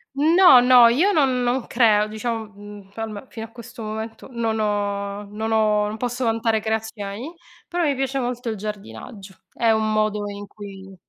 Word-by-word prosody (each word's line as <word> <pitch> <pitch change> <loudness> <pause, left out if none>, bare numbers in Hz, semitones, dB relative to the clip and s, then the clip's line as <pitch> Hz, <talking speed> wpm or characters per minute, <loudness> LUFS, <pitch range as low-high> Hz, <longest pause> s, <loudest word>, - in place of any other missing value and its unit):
No, 320 -1 +7
no, 245 -1 +7
io 300 +13 +3
non 265 -8 +2
non 245 0 0
creo, 215 -3 +3
diciam 220 0 -4
mhmm, 205 -1 -12
poi 225 - -6
alme 215 +3 -8
fino 225 -1 -7
a - - -22
questo 235 0 -11
momento 220 +3 -6
non 225 -2 -2
ho 205 -1 -2
non 220 +1 -4
ho 210 -1 +2
non 215 +1 -4
posso 245 +2 -3
vantare 225 -1 +1
creazioni, 220 +4 -4 0.3
però 350 0 -2
mi 285 - +1
piace 270 0 -2
molto 245 -1 -3
il 220 - -4
giardinaggio. 200 -1 -8
È 230 -1 +1
un 220 0 +1
modo 215 -1 0
in 205 0 -7
cui 195 -2 -11
220 Hz, 180 wpm, -22 LUFS, 210-245 Hz, 0.3 s, No